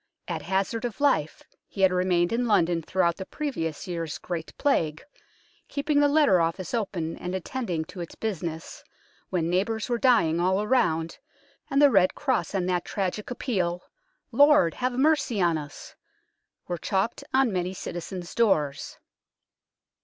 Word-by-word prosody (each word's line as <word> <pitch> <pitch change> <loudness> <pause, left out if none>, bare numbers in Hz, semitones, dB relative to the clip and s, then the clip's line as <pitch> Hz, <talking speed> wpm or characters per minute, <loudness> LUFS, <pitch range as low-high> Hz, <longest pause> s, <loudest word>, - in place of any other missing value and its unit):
At - - -3
hazard 195 +4 -1
of 240 -3 -4
life 275 - +1 0.2
he 195 - -6
had 190 -1 +5
remained 180 0 +1
in 240 +1 0
London 175 -5 +2
throughout 170 0 0
the 190 - -6
previous 200 - -4
year's 165 -3 -4
Great 170 -3 -5
Plague, 160 - 0 0.6
keeping 290 +1 0
the 290 - +5
letter 285 - +4
office 165 +2 -2
open 185 -8 -2
and 180 +1 -4
at 190 - -5
tending 185 -12 -3
to 180 +1 -9
its 170 - -8
business, 170 -7 -5 0.5
when 170 -3 0
neighbours 205 +6 -1
were 240 -1 0
dying 220 - +3
all 185 +2 +2
around, 165 - +1 0.5
and 275 -1 +2
the 285 -1 +6
red 190 -4 +4
cross 260 -7 -1
and 185 -2 0
that 180 -1 0
tragic 200 +1 -3
appeal, 185 -9 -2 0.2
" - - -45
Lord, 285 - +5
have 255 0 -2
mercy 270 -4 +2
on 170 -3 +3
us! 145 -2 -8 0.4
" - - -53
were 175 -1 -3
chalked 195 - -1
on 265 -5 +3
many 180 0 -1
citizens' 175 0 -6
doors. 155 -12 0
190 Hz, 160 wpm, -26 LUFS, 170-240 Hz, 0.6 s, the